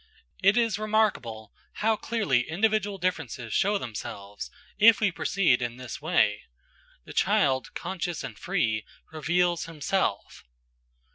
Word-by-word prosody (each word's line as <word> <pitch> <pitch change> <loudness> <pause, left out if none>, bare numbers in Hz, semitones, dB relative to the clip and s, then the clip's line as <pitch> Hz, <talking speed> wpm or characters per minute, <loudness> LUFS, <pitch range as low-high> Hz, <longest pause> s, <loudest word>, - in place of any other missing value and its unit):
It 195 +4 +5
is 230 -4 +2
remarkable 210 - 0 0.2
how 220 +1 +1
clearly 180 - 0
individual 205 +3 +1
differences 130 - -3
show 205 +2 +2
themselves, 105 - -7 0.3
if 220 -1 +7
we 210 -3 +2
proceed 170 -8 +2
in 120 0 -3
this 130 -2 -7
way; - - +2 0.6
the - - -10
child, 130 -2 +2
conscious 175 -2 -4
and - - -6
free, 120 - -1 0.3
reveals 175 +2 +1
himself. 165 - -2
175 Hz, 120 wpm, -27 LUFS, 125-205 Hz, 0.6 s, if